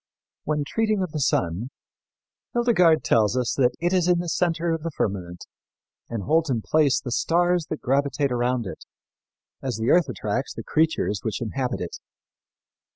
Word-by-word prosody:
When 150 Hz, -1 st, 0 dB
treating 215 Hz, +3 st, 0 dB
of 180 Hz, -, -4 dB
the 155 Hz, -, -3 dB
sun, 100 Hz, -, 0 dB, 0.8 s
Hildegard 180 Hz, -10 st, +4 dB
tells 110 Hz, +2 st, +2 dB
us 125 Hz, -2 st, 0 dB
that 125 Hz, -2 st, +2 dB
it 175 Hz, +2 st, 0 dB
is 180 Hz, -2 st, +2 dB
in 180 Hz, -1 st, +4 dB
the 175 Hz, 0 st, -3 dB
center 170 Hz, 0 st, 0 dB
of 165 Hz, -1 st, -1 dB
the 165 Hz, -, -3 dB
firmament 90 Hz, -, -3 dB, 0.6 s
and 115 Hz, -4 st, -4 dB
holds 160 Hz, -, +2 dB
in 115 Hz, -5 st, -1 dB
place 150 Hz, -4 st, +3 dB
the 125 Hz, -, -6 dB
stars 175 Hz, +4 st, +1 dB
that 155 Hz, -, -4 dB
gravitate 140 Hz, +1 st, +1 dB
around 120 Hz, -1 st, 0 dB
it, 95 Hz, -, -8 dB, 0.8 s
as 130 Hz, -5 st, -3 dB
the 110 Hz, +1 st, +1 dB
earth 170 Hz, -5 st, +4 dB
attracts 120 Hz, +3 st, -3 dB
the -, -, -6 dB
creatures 155 Hz, -10 st, +1 dB
which 110 Hz, -, -3 dB
inhabit 125 Hz, +2 st, -3 dB
it. 90 Hz, -, -5 dB
140 Hz, 165 wpm, -24 LUFS, 120-165 Hz, 0.8 s, Hildegard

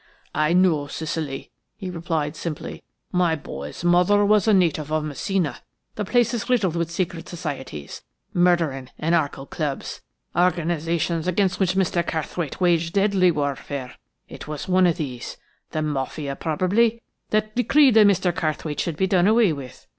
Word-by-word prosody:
"I 155 Hz, +2 st, +2 dB
know 175 Hz, -6 st, +3 dB
Sicily," 155 Hz, -2 st, -4 dB, 0.3 s
he 190 Hz, -3 st, -5 dB
replied 165 Hz, -3 st, -2 dB
simply. 160 Hz, -2 st, -5 dB, 0.3 s
"My 175 Hz, -2 st, +2 dB
boy's 75 Hz, -, -8 dB
mother 180 Hz, +4 st, +4 dB
was 210 Hz, 0 st, +3 dB
a -, -, +6 dB
native 160 Hz, -5 st, +1 dB
of 155 Hz, 0 st, +1 dB
Messina. 155 Hz, +3 st, -2 dB, 0.3 s
The 210 Hz, -, -3 dB
place 240 Hz, +3 st, +2 dB
is 235 Hz, +1 st, -3 dB
riddled 200 Hz, -9 st, +2 dB
with 170 Hz, -1 st, -1 dB
secret 170 Hz, -1 st, -3 dB
societies, 140 Hz, -, -6 dB, 0.3 s
murdering, 165 Hz, -7 st, +2 dB
anarchical 155 Hz, -4 st, 0 dB
clubs: 145 Hz, -3 st, -4 dB, 0.3 s
organisations 170 Hz, -1 st, 0 dB
against 185 Hz, +1 st, +1 dB
which 185 Hz, -1 st, +1 dB
Mr. 185 Hz, -2 st, +1 dB
Carrthwaite 160 Hz, -1 st, -3 dB
waged 170 Hz, -2 st, +2 dB
deadly 195 Hz, -2 st, +3 dB
warfare. 140 Hz, -4 st, -3 dB, 0.3 s
It -, -, -10 dB
is 150 Hz, -2 st, -5 dB
one 185 Hz, 0 st, +4 dB
of 170 Hz, -, +1 dB
these–the 140 Hz, +2 st, -6 dB
Mafia, 140 Hz, -1 st, -3 dB
probably–that 215 Hz, +5 st, 0 dB
decreed 275 Hz, +2 st, +5 dB
that 215 Hz, -1 st, +7 dB
Mr. 185 Hz, -2 st, +2 dB
Carrthwaite 155 Hz, -2 st, -2 dB
should 165 Hz, -4 st, -2 dB
be 190 Hz, -, +2 dB
done 185 Hz, -1 st, +3 dB
away 220 Hz, -5 st, +4 dB
with. 135 Hz, -3 st, -9 dB
170 Hz, 145 wpm, -23 LUFS, 150-190 Hz, 0.3 s, that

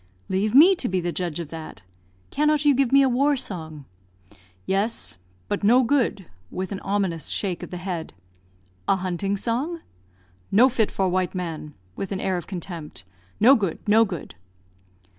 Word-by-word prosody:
"Leave 205 Hz, +4 st, 0 dB
me 335 Hz, +8 st, +9 dB
to 305 Hz, -9 st, 0 dB
be 185 Hz, 0 st, 0 dB
the 175 Hz, 0 st, -2 dB
judge 175 Hz, -2 st, -3 dB
of 165 Hz, -4 st, -5 dB
that. 155 Hz, -, -9 dB, 0.5 s
Cannot 300 Hz, 0 st, +2 dB
you 290 Hz, -, +6 dB
give 270 Hz, -2 st, +1 dB
me 275 Hz, 0 st, +6 dB
a -, -, +4 dB
war 275 Hz, +3 st, +2 dB
song?" 160 Hz, -, -6 dB, 0.8 s
"Yes, 200 Hz, -, -1 dB, 0.3 s
but -, -, -2 dB
no 245 Hz, +5 st, +5 dB
good," 240 Hz, -7 st, +1 dB, 0.2 s
with 185 Hz, +1 st, -5 dB
an 195 Hz, -, -4 dB
ominous 195 Hz, -5 st, -1 dB
shake 185 Hz, -4 st, -2 dB
of -, -, -7 dB
the 180 Hz, -, -6 dB
head. 175 Hz, -2 st, -4 dB, 0.8 s
"A -, -, +4 dB
hunting 190 Hz, +2 st, -2 dB
song?" 270 Hz, -, -2 dB, 0.7 s
"No 240 Hz, +6 st, +6 dB
fit 230 Hz, -4 st, +1 dB
for 190 Hz, -, 0 dB
white 185 Hz, 0 st, 0 dB
man," 160 Hz, -4 st, -5 dB, 0.2 s
with 195 Hz, -, -5 dB
an 195 Hz, -, -2 dB
air 190 Hz, -1 st, 0 dB
of 175 Hz, -, -6 dB
contempt. 170 Hz, -, -7 dB, 0.3 s
"No 250 Hz, +6 st, +7 dB
good, 195 Hz, -9 st, -1 dB
no 220 Hz, +2 st, +6 dB
good!" 185 Hz, -7 st, -5 dB
195 Hz, 170 wpm, -24 LUFS, 175-245 Hz, 0.8 s, me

